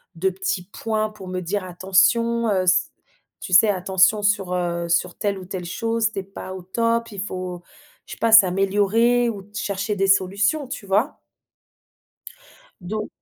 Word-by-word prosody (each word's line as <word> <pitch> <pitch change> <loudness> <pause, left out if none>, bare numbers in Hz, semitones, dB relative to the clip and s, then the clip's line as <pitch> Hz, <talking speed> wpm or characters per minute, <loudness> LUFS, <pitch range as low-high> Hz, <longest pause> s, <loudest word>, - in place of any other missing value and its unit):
de 190 +3 +1
petits 190 -1 -3
points 215 -1 -2
pour 195 -3 -12
me 185 0 -4
dire 190 +3 -3
attention, 210 +6 +2
heu, 190 -2 +1
s 185 +1 +2 0.5
tu 185 - -6
sais 210 +4 +7
attention 190 +2 +2
sur, 200 -3 +1
heu, 170 -1 -2
sur 170 +1 +1
telle 200 -1 -1
ou 185 - -9
telle 185 -1 -6
chose. 225 +4 -1
Tu 195 - -4
es - - -5
pas 190 -1 -9
au 185 - -9
top, 230 +4 -1
il 195 -2 -6
faut 185 -3 -5 0.5
je - - -8
sais - - -10
pas 230 -1 +1
s'améliorer 205 +4 +4
ou 200 -3 -7
chercher 200 +1 -2
des 195 0 +1
solutions 200 +9 +1
tu 220 - -7
vois? 210 +9 0 1.7
Don 215 +2 -4
195 Hz, 170 wpm, -22 LUFS, 185-215 Hz, 1.7 s, sais